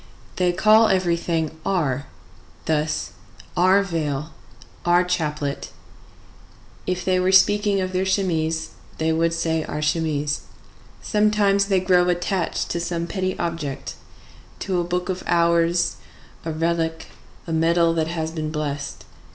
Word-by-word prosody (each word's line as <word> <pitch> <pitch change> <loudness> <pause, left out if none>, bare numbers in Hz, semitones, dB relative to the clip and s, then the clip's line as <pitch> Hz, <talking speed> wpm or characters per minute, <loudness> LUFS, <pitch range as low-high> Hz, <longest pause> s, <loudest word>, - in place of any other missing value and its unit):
They 180 -1 +3
call 215 +5 +5
everything 170 -4 0
our; 140 -8 0 0.6
thus: 155 0 -1 0.4
our 185 +3 +4
veil, 155 -4 -3 0.5
our 175 +1 +4
chaplet; 150 -5 -2 1.2
if 180 -1 -2
they 185 -1 +2
were 185 +1 +2
speaking 205 +1 +4
of 185 0 -3
their 185 +1 +1
chemise, 165 -5 0 0.3
they 160 0 +1
would 165 +1 +2
say 160 -1 0
our 150 - -4
chemise. 150 -2 0 0.6
Sometimes 210 -2 +3
they 195 -2 +3
grow 180 -1 +3
attached 175 0 -1
to 170 - -1
some 170 0 -2
petty 185 +1 -2
object,—to 170 +3 -5
a - - +1
book 180 +1 -2
of 185 -1 -2
hours, 170 0 +2 0.5
a 165 - -2
relic, 165 0 -1 0.4
a 165 - -4
medal 165 +1 +3
that 160 -1 0
has 160 -1 -3
been 155 -2 -3
blessed. 145 -2 -4
170 Hz, 125 wpm, -23 LUFS, 160-185 Hz, 1.2 s, call